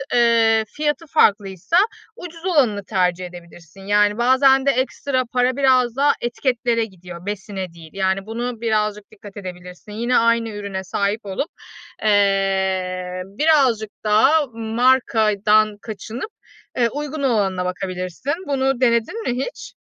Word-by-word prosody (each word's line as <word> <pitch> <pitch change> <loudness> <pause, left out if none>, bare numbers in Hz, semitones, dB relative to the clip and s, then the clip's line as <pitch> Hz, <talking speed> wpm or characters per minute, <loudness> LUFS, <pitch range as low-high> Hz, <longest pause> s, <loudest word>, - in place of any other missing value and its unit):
ııı, 230 -2 +4
fiyatı 300 +2 -1
farklıysa 205 - +2 0.4
ucuz 335 0 -10
olanını 250 - +2
tercih 180 -3 0
edebilirsin. 175 +1 -13
Yani, 205 +1 +2
bazen 265 +2 +4
de 275 - +5
ekstra 260 +1 -1
para 250 0 +2
biraz 255 -3 +3
daha 285 +1 +3
etiketlere 240 -1 0
gidiyor, 180 -3 -12
besine 195 -3 -5
değil. 165 -2 -13
Yani, 195 0 -1
buna 235 +1 -4
birazcık 210 -2 -1
dikkat 205 -1 -13
edebilirsin. 180 +1 -9
Yine 235 +4 0
aynı 230 0 +2
ürüne 200 -2 -5
sahip 200 +3 -2
olup, 200 - -3 0.5
eee, 190 -3 +1
birazcık 240 -1 +2
daha 265 +9 +4
markadan 220 -3 +2
kaçınıp, 225 - -7 0.5
ııı, 235 -1 +3
uygun 295 +1 -5
olanına 195 -7 +1
bakabilirsin. 185 - -4
Bunu 270 -2 0
denedin 235 - +1
mi 250 +2 -1
hiç? - - -9
220 Hz, 125 wpm, -21 LUFS, 195-255 Hz, 0.5 s, de